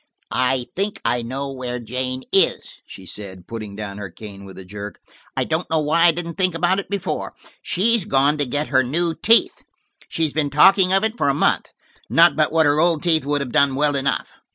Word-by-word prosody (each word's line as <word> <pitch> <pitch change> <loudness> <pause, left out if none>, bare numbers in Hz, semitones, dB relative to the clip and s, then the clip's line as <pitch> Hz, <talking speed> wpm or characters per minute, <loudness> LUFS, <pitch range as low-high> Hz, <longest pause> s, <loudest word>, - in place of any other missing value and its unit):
"I 130 0 0
think 200 +2 -3
I 120 - +1
know 135 +4 -5
where 125 -2 -5
Jane 130 +2 -4
is," - - +1
she 95 - -12
said, 95 -2 -7
putting 110 -3 -7
down 105 -1 -7
her 100 -2 -6
cane 100 +1 -11
with 95 -1 -12
a 95 - -10
jerk. 100 +2 -8 0.4
"I - - +2
don't 160 +2 -2
know 160 - +1
why 160 +3 +2
I - - +6
didn't 170 0 -6
think 185 -2 +1
about 180 +3 +1
it - - -7
before. 200 -1 -4 0.3
She's 225 +3 +1
gone 145 -4 +2
to 145 - 0
get 145 +4 -2
her 130 - +3
new 165 +7 0
teeth; 225 +7 +3 0.5
she's 160 -3 0
been 150 -2 0
talkin' 185 +6 +5
of 195 +2 +3
it 220 +2 -2
for - - +2
a 135 - +1
month. - - +1 0.4
Not 170 +1 +5
but 155 -1 +1
what 160 0 +3
her 145 +1 +2
old 165 -2 +2
teeth 160 -5 +2
would 145 0 0
have 130 -3 -5
done 140 +1 +3
well 145 +1 +1
enough." 140 0 0
145 Hz, 215 wpm, -21 LUFS, 125-170 Hz, 0.5 s, I